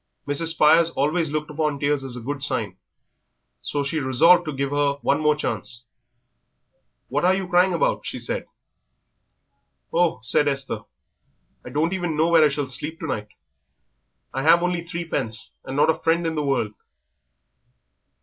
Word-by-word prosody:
Mrs. 145 +3 0
Spires 160 +1 +5
always 160 +2 0
looked 150 0 -3
upon 150 -1 -1
tears 145 -1 0
as 130 -2 -6
a - - -7
good 140 +4 -4
sign, 115 -9 -1 0.9
so 145 -1 -2
she 145 +3 -2
resolved 165 +7 +4
to 155 - -3
give 140 0 -3
her 145 -1 +1
one 145 +2 +2
more 150 -1 +3
chance. 120 -5 -4 1.3
"What 145 +3 -1
are 185 +1 +4
you 190 -1 -3
crying 180 +1 +3
about?" 165 - 0
she - - -5
said. - - -4 1.5
"Oh," 175 0 +2
said 145 +6 +3
Esther, 135 -1 -2 0.8
"I - - -9
don't 160 +5 0
even 175 -4 -2
know 160 +2 +3
where 165 -2 +6
I 150 - +5
shall 145 0 -2
sleep 140 +5 -3
tonight. 110 - -4 1.1
I 135 - -2
have 165 +4 +5
only 180 -1 -1
threepence, 165 -10 -4
and 130 +1 -5
not 150 +2 +5
a - - -5
friend 165 +1 +1
in 165 - -1
the 155 - -1
world." 130 -7 -1
150 Hz, 160 wpm, -23 LUFS, 140-165 Hz, 1.5 s, where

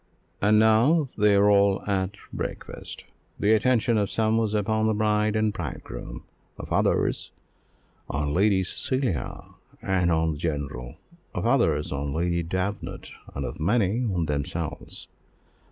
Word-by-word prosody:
And 105 +1 +4
now 115 +9 +4
they 105 -1 +4
are 100 +1 +5
all 100 -1 +4
at 95 0 -1 0.2
breakfast. - - -6 0.3
The 105 +2 +4
attention 115 0 +3
of 100 -1 0
some 110 0 +1
was 110 -2 +1
upon 110 +1 +1
the 110 - +1
bride 105 0 +1
and 110 -1 +1
bridegroom; - - -6 0.3
of - - -9
others, - - +1 0.8
on 75 0 -1
Lady 95 +1 +3
Cecilia 120 - -2 0.4
and 90 -2 +1
on 80 0 +2
the 75 - -4
general; 70 -5 -4 0.4
of - - -2
others, 100 - +2
on 70 0 -3
Lady 85 +1 0
Davenant; 95 +4 -4 0.2
and 70 - -3
of - - -6
many, 105 +5 +1
on 85 -3 0
themselves. 75 +2 -4
100 Hz, 135 wpm, -26 LUFS, 80-110 Hz, 0.8 s, are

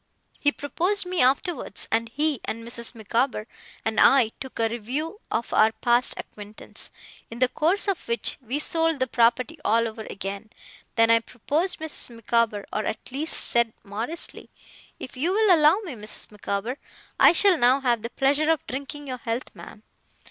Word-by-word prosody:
He 290 - +3
proposed 360 +8 -1
me 360 -1 -1
afterwards; 265 - 0
and 230 +1 +1
he, 295 0 0
and 230 +1 -5
Mrs. 235 0 0
Micawber, 230 +1 -1 0.4
and 220 0 0
I, 260 -5 +6
took 265 - -8
a 225 - +2
review 265 - -4
of 230 - -2
our 220 +1 +4
past 240 +2 +2
acquaintance, 210 0 -8 0.4
in 230 - -8
the 255 +1 +3
course 325 - +1
of 395 -3 -2
which 235 0 -1
we 250 +4 -2
sold 325 0 +1
the 260 - +2
property 255 +6 +1
all 230 +1 +2
over 220 0 -8
again. 195 +2 -6 0.5
Then 225 0 +4
I 230 - +6
proposed 290 - -2
Mrs. 315 -4 -1
Micawber: 230 -2 0
or, 215 - -1
at 220 - -5
least, 295 +5 +2
said, 235 -2 +2
modestly, 225 +12 -4 0.5
'If 255 - -8
you'll 375 +7 +3
allow 305 +3 +5
me, 355 -9 -7
Mrs. 215 -2 -2
Micawber, 210 +5 -4 0.4
I - - +8
shall 380 +2 +5
now 260 -1 +3
have 240 -4 +1
the 230 - -5
pleasure 285 +5 +1
of 320 -3 +1
drinking 280 +2 -6
your 255 -2 -5
health, 230 +2 -4
ma'am. - - -12
250 Hz, 170 wpm, -25 LUFS, 230-305 Hz, 0.5 s, I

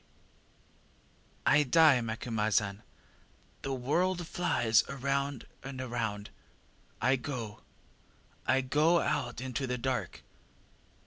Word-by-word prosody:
ŌĆÖ - - +6
ŌĆ£ŌĆśI - - -13
die, 155 -5 +6
Macumazahn 110 -3 -1 0.8
the 135 - -4
world 170 +8 0
flies 120 -10 +2
round 140 -1 -2 0.2
and 135 0 -7
round. 105 -4 -3 0.7
I 130 +2 +3
go 120 -5 -6 0.9
I 130 +1 +4
go 150 +6 +3
out 120 -5 -1
into 130 0 -3
the 125 0 -1
dark! 125 0 -3
130 Hz, 100 wpm, -31 LUFS, 115-140 Hz, 0.9 s, ŌĆÖ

